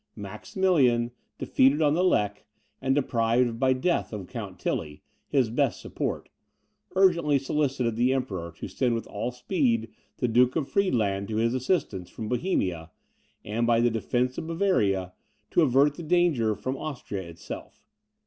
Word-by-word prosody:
Maximilian, 120 - +1 0.3
defeated 135 +3 +3
on 150 -2 +3
the 175 +3 +2
Lech, 105 - +1 0.4
and 135 0 +1
deprived 115 -3 +1
by 130 0 +3
death 130 +7 0
of 105 -4 -5
Count 105 -4 -7
Tilly, 75 -2 -3 0.2
his 130 -6 +1
best 135 -1 +1
support, - - -4 0.7
urgently 170 -6 +4
solicited 135 -4 0
the 120 +3 +2
Emperor 95 -10 -2
to - - -7
send 125 -3 0
with 115 - -4
all 110 +4 -4
speed 125 - 0 0.3
the 125 - 0
Duke 125 +2 +3
of 155 -4 0
Friedland 105 - +1
to 110 - -4
his 115 +2 +1
assistance, 130 - -1
from 110 -2 -6
Bohemia, 95 - -1 0.6
and 115 +3 -1
by 115 -1 +4
the 120 0 +3
defence 125 +3 -1
of 160 - -6
Bavaria, 105 - +1 0.4
to - - +4
avert 140 0 +4
the 160 - -9
danger 155 -10 +2
from 130 +5 -4
Austria 125 -10 -5
itself. 85 -2 -9
125 Hz, 150 wpm, -27 LUFS, 110-145 Hz, 0.7 s, urgently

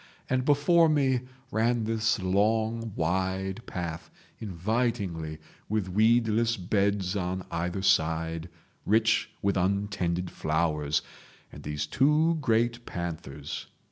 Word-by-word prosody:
And 130 0 0
before 155 +3 +4
me 135 -4 +2 0.3
ran 115 +1 +1
this 115 0 +1
long 110 +4 +1
wide 95 +4 -1
path, 85 -2 -5 0.3
invitingly, 95 -5 -2 0.3
with 105 -3 -1
weedless 115 +3 +3
beds 100 0 0
on 95 -1 -2
either 85 +3 -2
side, 80 -2 +1 0.3
rich 110 +2 +2
with 100 0 +2
untended 90 -2 0
flowers, 75 -2 0 0.5
and - - -10
these 75 -1 -3
two 150 - +3
great 120 -1 +1
panthers. 80 -5 -5
100 Hz, 105 wpm, -28 LUFS, 85-115 Hz, 0.5 s, before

